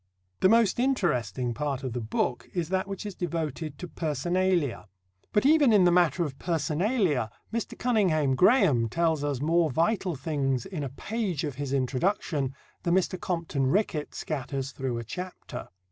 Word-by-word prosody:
The 185 - +5
most 230 -1 +4
interesting 130 - 0
part 140 +1 -2
of 130 -3 -3
the 120 - -3
book 115 +2 -2
is 170 -3 -1
that 190 +1 0
which 195 0 -5
is 205 - -4
devoted 160 -4 -3
to 180 - -6
personalia. 170 -3 0 0.4
But 210 - +2
even 290 -3 +6
in 205 -4 +6
the 175 - +5
matter 175 0 +3
of 140 -4 -5
personalia 165 - 0 0.2
Mr. 230 -1 -3
Cunninghame 185 - +2
Graham 140 - +4
tells 160 +1 +1
us 140 -3 -1
more 165 +2 +3
vital 170 - +1
things 135 -2 -1
in 190 -5 -5
a 135 - -3
page 190 - -3
of 145 -3 -2
his 140 -2 -3
introduction 140 - 0 0.3
than 170 0 +1
Mr. 185 -1 0
Compton 165 -6 -1
Rickett 160 -2 0
scatters 135 -2 -3
through 130 -3 -3
a 115 - -4
chapter. 180 - -7
160 Hz, 160 wpm, -28 LUFS, 135-185 Hz, 0.4 s, even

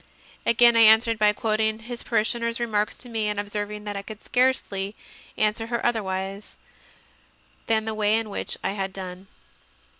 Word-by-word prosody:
Again 235 +1 +5
I - - +5
answered 225 +1 +6
by 210 -1 +5
quoting 220 0 0
his 235 +2 -8
parishioner 230 0 0
s 230 0 -1
remarks 215 -3 0
to 250 - -8
me 225 -3 -1
and 210 -1 -1
observing 205 0 -4
that 205 -1 -5
I 200 - -3
could 215 +1 -10
scarcely 220 -6 0 0.4
answer 215 +1 0
her 235 0 -2
otherwise 195 -3 -2 1.1
than 220 -1 +1
the 220 - -2
way 215 0 +2
in 225 -2 -3
which - - -3
I - - 0
had 195 -1 -3
done. 185 0 -8
215 Hz, 170 wpm, -25 LUFS, 205-230 Hz, 1.1 s, answered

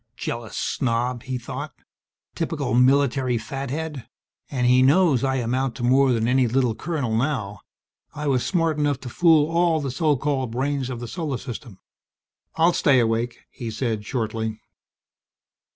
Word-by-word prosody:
Jealous 115 -1 -5
snob! 120 -1 -1
he 130 0 -4
thought. 120 - -7 0.6
_Typical 120 +2 +1
military 135 -2 +2
fathead, 135 +3 -5 0.4
and 125 -3 -1
he 125 +1 +5
knows 140 -1 +4
I 135 0 +1
amount 125 +1 -1
to 120 - -6
more 130 +2 +4
than 115 -2 +1
any 125 0 +3
little 125 0 +1
colonel 140 -5 -2
now. 110 -6 -1 0.6
I 150 - -4
was 130 -4 +1
smart 165 -4 0
enough 145 -2 +1
to 125 - -7
fool 160 0 +4
all 170 -1 +2
the 140 -3 -3
so 150 +2 +2
called 135 -2 -1
brains 135 +2 -2
of 120 -2 -5
the 120 - -5
Solar 155 -3 -3
System._ 120 -4 -8 0.8
"I'll 165 +2 +4
stay 140 -5 +4
awake," 115 +1 0
he 115 - -6
said 110 -1 -2
shortly. 110 -2 -3
130 Hz, 150 wpm, -23 LUFS, 120-145 Hz, 0.8 s, he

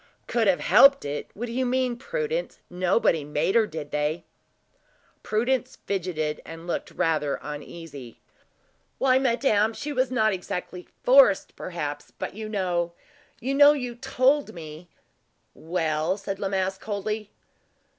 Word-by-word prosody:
"Could 230 -3 +1
have 190 -2 +3
helped 275 - +6
it? 145 +1 -4
What 235 - -4
do 235 - -7
you 255 +2 0
mean, 255 -1 0
Prudence? 475 - -3
Nobody 180 -3 +2
made 150 +6 0
her, 225 -2 +4
did 155 -4 -7
they?" 150 +3 -1 1.0
Prudence 245 +4 -1
fidgeted, 165 -6 -2
and 165 +1 -10
looked 175 - -3
rather 150 -3 0
uneasy. 145 -4 -8 0.8
"Why, 260 -1 +4
madame, 230 -4 +2
she 295 +5 -5
was 255 -1 +1
not 220 -5 +2
exactly 180 -1 -5 0.2
forced, 260 -6 +5
perhaps; 145 -5 -5
but - - -4
you 215 +1 -6
know 175 -4 -1 0.5
you 265 +3 -2
know 285 +1 +8
you 250 -4 -4
told 260 +3 +1
me 160 +1 -10 0.3
" - - -45 0.2
"Well?" 160 0 0
said 195 -1 -5
La 200 - -1
Masque, 190 0 -1
coldly. 210 0 -3
195 Hz, 140 wpm, -26 LUFS, 165-250 Hz, 1.0 s, know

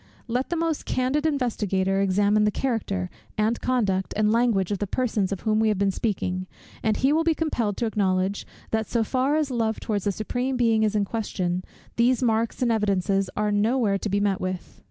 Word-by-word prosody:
Let 250 +3 -1
the 345 - -1
most 330 -2 -1
candid 270 +5 +1
investigator 200 - 0
examine 205 +2 +3
the 210 - +4
character, 210 - -2 0.3
and 220 +2 +1
conduct, 205 -7 0
and 215 0 +3
language 225 -5 +2
of 200 - -1
the 205 - -2
persons 215 -4 0
of 195 - -3
whom 215 0 +1
we 220 - +3
have 210 -2 +1
been 200 0 +2
speaking; 185 -3 -2 0.3
and 220 -1 +1
he 270 +2 +3
will 320 +1 +2
be 325 -1 +2
compelled 235 -11 -1
to 235 - 0
acknowledge, 195 -2 0 0.2
that 220 -1 0
so 235 -2 +1
far 260 +5 +1
as 305 -3 0
love 225 -2 0
towards 205 -3 -2
the 205 - +2
Supreme 245 +6 -2
Being 225 -2 +3
is 215 -1 +1
in 205 -1 +2
question, 185 -5 -2 0.3
these 245 +2 +3
marks 230 +1 +1
and 240 - +2
evidences 195 -3 +1
are 210 0 +1
no 215 +5 +2
where 200 -6 +1
to 210 - -3
be 200 +1 +1
met 200 -2 0
with. 185 -1 -5
215 Hz, 205 wpm, -25 LUFS, 195-245 Hz, 0.3 s, the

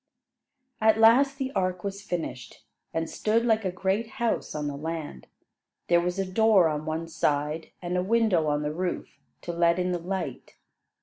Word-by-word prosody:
At 220 0 +5
last 255 +5 +5
the 265 -1 -3
ark 185 -5 -1
was 200 0 -4
finished, 160 - -5 0.3
and 165 0 -2
stood 225 +7 0
like 220 -2 +2
a 185 - -1
great 190 +5 -1
house 235 -9 -1
on 150 -1 -2
the 145 -1 -3
land. 155 - -6 0.6
There 170 0 +5
was 180 +1 -2
a 195 - 0
door 195 -1 +4
on 150 +1 -3
one 160 +1 -2
side, 150 0 -1
and 175 +1 -2
a 180 - +2
window 200 -5 +2
on 145 0 0
the 150 0 -2
roof, 180 +2 -4 0.2
to 175 - -5
let 170 0 +3
in 180 0 0
the 175 - -1
light. 170 -6 -5
180 Hz, 180 wpm, -27 LUFS, 160-210 Hz, 0.6 s, At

